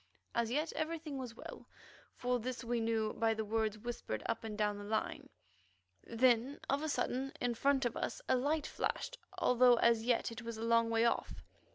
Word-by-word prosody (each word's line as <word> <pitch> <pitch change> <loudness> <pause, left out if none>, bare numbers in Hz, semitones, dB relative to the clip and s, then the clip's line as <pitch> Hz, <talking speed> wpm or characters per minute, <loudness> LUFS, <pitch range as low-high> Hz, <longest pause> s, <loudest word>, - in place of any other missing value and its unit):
As 235 -1 +1
yet 300 +6 0
everything 315 -3 -3
was 245 -3 -6
well; - - -10 0.5
for 250 0 0
this 250 +2 -4
we 235 0 0
knew 225 -1 0
by 225 -1 +1
the 220 0 -2
words 220 0 0
whispered 215 - -4
up 230 - -2
and 215 -2 -5
down 210 -1 0
the - - -7
line. 215 +2 -2 0.7
Then 245 +3 +2
of 275 +2 +1
a 315 - -2
sudden, 260 0 -1
in 245 -1 0
front 270 +2 +2
of 240 - -1
us - - -3
a - - +4
light 290 +4 +1
flashed, - - -3 0.2
although 250 0 +5
as 230 -1 +4
yet 240 0 +1
it 230 +2 -7
was 230 -1 -6
a 220 - -5
long 230 0 +3
way 230 0 +3
off. 235 - -1
235 Hz, 195 wpm, -35 LUFS, 225-260 Hz, 0.7 s, although